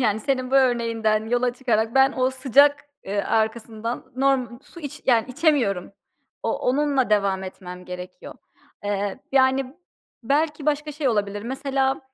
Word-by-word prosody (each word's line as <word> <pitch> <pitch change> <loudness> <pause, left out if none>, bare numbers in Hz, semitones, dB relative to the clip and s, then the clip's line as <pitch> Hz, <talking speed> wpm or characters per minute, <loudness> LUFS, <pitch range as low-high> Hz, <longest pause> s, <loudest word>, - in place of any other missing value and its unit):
yani, 215 -3 +1
senin 255 +1 -1
bu - - 0
örneğinden 230 -4 +2
yola 245 +1 +1
çıkarak 230 -3 0
ben 270 +1 +5
o 255 0 +2
sıcak, 280 +3 +3 0.2
ııı, 200 +1 -1
arkasından 225 +2 -2
norm 260 -3 +1
su 340 - -14
iç, 285 -3 -8
yani, 230 -3 +4
içemiyorum. 245 - +1 0.5
O - - -1
onunla 275 -2 +1
devam 200 -2 +2
etmem 180 -1 -9
gerekiyor. 180 0 -9 0.5
Eee, 205 -1 -2
yani, 265 0 +2 0.5
belki 300 +4 0
başka 300 0 0
şey 290 -2 -1
olabilir 205 -2 -1
mesela, 270 +1 -1
250 Hz, 140 wpm, -23 LUFS, 215-270 Hz, 0.5 s, ben